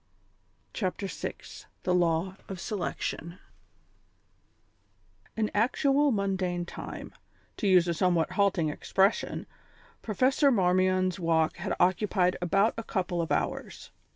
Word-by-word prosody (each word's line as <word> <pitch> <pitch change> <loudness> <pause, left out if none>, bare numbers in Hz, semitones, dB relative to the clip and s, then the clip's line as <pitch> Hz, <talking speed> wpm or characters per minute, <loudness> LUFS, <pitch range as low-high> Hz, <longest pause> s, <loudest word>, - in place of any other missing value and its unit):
CHAPTER 195 -1 -2
VI 195 - -4 0.5
THE 180 - +1
LAW 175 +1 +1
OF 190 -2 -6
SELECTION 175 -3 -4 2.0
In 215 -1 0
actual 275 +6 +2
mundane 190 -4 -1
time, - - -8 0.4
to 210 - -1
use 180 -2 +5
a 170 - +1
somewhat 170 -1 +1
halting 190 -6 +2
expression, 190 +6 0 0.6
Professor 260 +6 +2
Marmion's 185 -3 +2
walk 165 -2 +1
had 180 +3 -3
occupied 180 0 +2
about 195 +5 +2
a - - -4
couple 180 -5 -2
of 165 - -4
hours. - - -3
185 Hz, 110 wpm, -28 LUFS, 175-205 Hz, 2.0 s, use